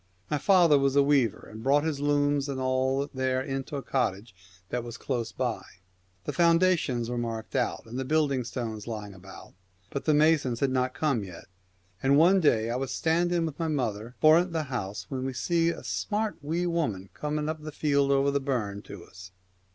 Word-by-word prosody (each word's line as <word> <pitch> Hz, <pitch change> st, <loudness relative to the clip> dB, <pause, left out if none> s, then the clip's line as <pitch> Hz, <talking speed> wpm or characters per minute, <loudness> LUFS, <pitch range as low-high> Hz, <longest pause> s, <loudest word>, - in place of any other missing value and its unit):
My 150 Hz, -, +1 dB
father 170 Hz, -4 st, +5 dB
was 135 Hz, 0 st, +1 dB
a 140 Hz, -, +6 dB
weaver, 140 Hz, -6 st, +1 dB
and 110 Hz, +1 st, -10 dB
brought 140 Hz, +4 st, +3 dB
his 155 Hz, -3 st, -2 dB
looms 145 Hz, 0 st, +1 dB
and 135 Hz, -1 st, -3 dB
all 130 Hz, +2 st, 0 dB
there 130 Hz, -1 st, 0 dB
into 135 Hz, +1 st, -4 dB
a 140 Hz, -, -4 dB
cottage 105 Hz, -5 st, -2 dB, 0.4 s
that 125 Hz, -1 st, -2 dB
was 120 Hz, 0 st, -8 dB
close 120 Hz, -3 st, -3 dB
by. 125 Hz, -3 st, -2 dB, 0.6 s
The -, -, -4 dB
foundations 170 Hz, -8 st, +2 dB
were 120 Hz, 0 st, -2 dB
marked 115 Hz, -2 st, -5 dB
out, -, -, -1 dB
and 120 Hz, +3 st, -6 dB
the -, -, -1 dB
building 140 Hz, -2 st, +1 dB
stones 115 Hz, -3 st, -5 dB
lying 105 Hz, -3 st, -6 dB
about, 95 Hz, +1 st, -13 dB, 0.4 s
but 140 Hz, -, -4 dB
the 155 Hz, -, +3 dB
masons 150 Hz, -6 st, +3 dB
had 140 Hz, -2 st, +1 dB
not 130 Hz, 0 st, 0 dB
come 140 Hz, -9 st, 0 dB
yet; 90 Hz, -3 st, -10 dB, 0.6 s
and 135 Hz, +1 st, +4 dB
one 180 Hz, +5 st, +6 dB
day 115 Hz, -9 st, +2 dB
I 120 Hz, -, -1 dB
was 135 Hz, 0 st, -3 dB
standing 170 Hz, +1 st, +1 dB
with 155 Hz, -3 st, -6 dB
my 165 Hz, -, 0 dB
mother 120 Hz, -5 st, -2 dB
foment 165 Hz, +5 st, +5 dB
the 160 Hz, -1 st, 0 dB
house, 100 Hz, -4 st, -4 dB
when 130 Hz, -2 st, -3 dB
we 130 Hz, 0 st, -3 dB
sees 170 Hz, +4 st, +1 dB
a -, -, -11 dB
smart 215 Hz, 0 st, -2 dB
wee 165 Hz, +5 st, -1 dB
woman 120 Hz, -, -2 dB
coming 150 Hz, 0 st, -3 dB
up 155 Hz, 0 st, -3 dB
the 155 Hz, 0 st, -7 dB
field 140 Hz, -2 st, +1 dB
over 140 Hz, 0 st, +3 dB
the 140 Hz, -, +1 dB
burn 120 Hz, -8 st, -2 dB
199 100 Hz, -1 st, -10 dB
The -, -, -13 dB
to -, -, -21 dB
us. 90 Hz, 0 st, -12 dB
135 Hz, 205 wpm, -28 LUFS, 120-155 Hz, 0.6 s, a